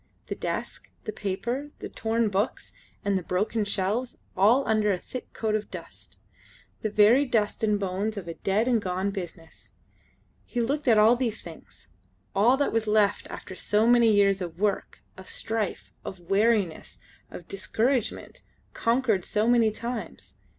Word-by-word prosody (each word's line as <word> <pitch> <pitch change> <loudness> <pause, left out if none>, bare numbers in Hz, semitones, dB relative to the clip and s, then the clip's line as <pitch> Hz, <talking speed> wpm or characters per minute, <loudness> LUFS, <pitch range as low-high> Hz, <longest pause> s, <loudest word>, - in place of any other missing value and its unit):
The - - -4
desk, - - -4
the - - -4
paper, 235 +9 -3
the - - -6
torn 225 0 0
books, 200 +4 -2 0.3
and 200 -1 +2
the - - -7
broken 205 +5 0
shelves, 205 +5 -1 0.2
all 225 +8 +4
under 215 -1 +3
a 190 - +1
thick 250 +7 -8
coat 220 -2 -2
of 215 -1 -1
dust. - - -10 0.6
The 215 - -1
very 215 +6 +5
dust 225 -5 0
and 210 -1 +2
bones 200 +3 -2
of 185 -4 -6
a 165 - -4
dead 200 +7 0
and 240 -3 +3
gone 185 +1 -1
business. 175 -4 -9 0.7
He 245 - -4
looked 275 +5 -1
at 225 -3 +6
all 220 +3 +6
these 235 -3 -2
things, 165 -2 -13 0.5
all 235 +7 +4
that 285 - 0
was 225 -1 0
left 210 -1 +2
after - - -8
so 210 +3 +1
many 235 -1 +5
years 200 -2 +3
of 170 -2 -5
work, 205 -1 -1
of 190 - -11
strife, 220 -3 -3
of 190 - -7
weariness, 205 -4 +1 0.3
of 175 - -10
discouragement, 230 +5 -1 0.3
conquered 230 -5 +1
so 210 +4 0
many 235 -2 +5
times. 235 +2 -6
215 Hz, 160 wpm, -27 LUFS, 195-235 Hz, 0.7 s, at